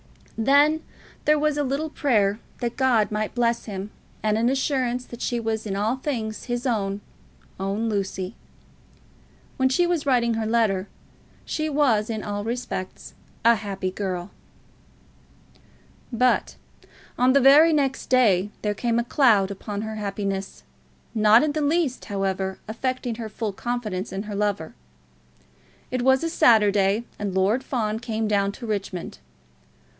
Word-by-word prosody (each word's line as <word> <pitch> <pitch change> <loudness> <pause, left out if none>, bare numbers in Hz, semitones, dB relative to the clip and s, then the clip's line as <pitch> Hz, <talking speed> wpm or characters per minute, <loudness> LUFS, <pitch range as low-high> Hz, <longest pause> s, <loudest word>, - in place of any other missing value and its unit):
Then 285 +7 +4 0.4
there 300 0 +4
was 300 0 +1
a - - +2
little 285 +3 -2
prayer 215 -9 +1 0.2
that 240 -1 -2
God 245 -6 +2
might 215 +1 -2
bless 235 -1 +1
him, 200 -1 -6 0.3
and 215 -1 +2
an 230 +2 +2
assurance 260 -2 0
that 240 - -10
she 240 - -1
was 220 -1 -2
in 195 - -2
all 215 +6 0
things 230 -6 -4
his 245 0 -3
own, 205 -5 -1 0.6
own 200 +4 -1
Lucy. 195 -2 -2 1.2
When 260 0 +3
she 350 +7 +3
was 345 -4 -1
writing 240 -3 +3
her 220 -1 -2
letter 215 -4 +1 0.6
she 310 0 -2
was 255 -8 +2
in 220 -2 -3
all 205 0 -3
respects 230 -5 -5 0.3
a 235 - +8
happy 195 -3 -3
girl. 185 -1 -4 1.8
But 250 +1 +1 0.6
on 255 +1 +4
the 280 - +6
very 290 +5 +7
next 275 -3 0
day 210 -7 +4
there 210 -1 +1
came 235 +2 -1
a 235 - +2
cloud 225 -7 +3
upon 205 +1 -5
her 220 0 -5
happiness, 195 -1 -4 0.5
not 215 +2 +5
in 305 - +1
the 305 +1 -2
least, 295 -3 0
however, 195 -1 -2
affecting 250 +1 -2
her 225 -1 -6
full 215 -1 -4
confidence 215 -4 -3
in 195 +1 -4
her 210 -1 -7
lover. 200 -5 -1 1.2
It 255 -1 -1
was 265 +2 +3
a 330 - 0
Saturday, 210 - +4 0.2
and 200 -2 -3
Lord 205 +7 +2
Fawn 220 -5 -2
came 225 -2 -2
down 200 -1 +1
to 240 - -9
Richmond. 200 -5 -4
225 Hz, 150 wpm, -24 LUFS, 205-255 Hz, 1.8 s, a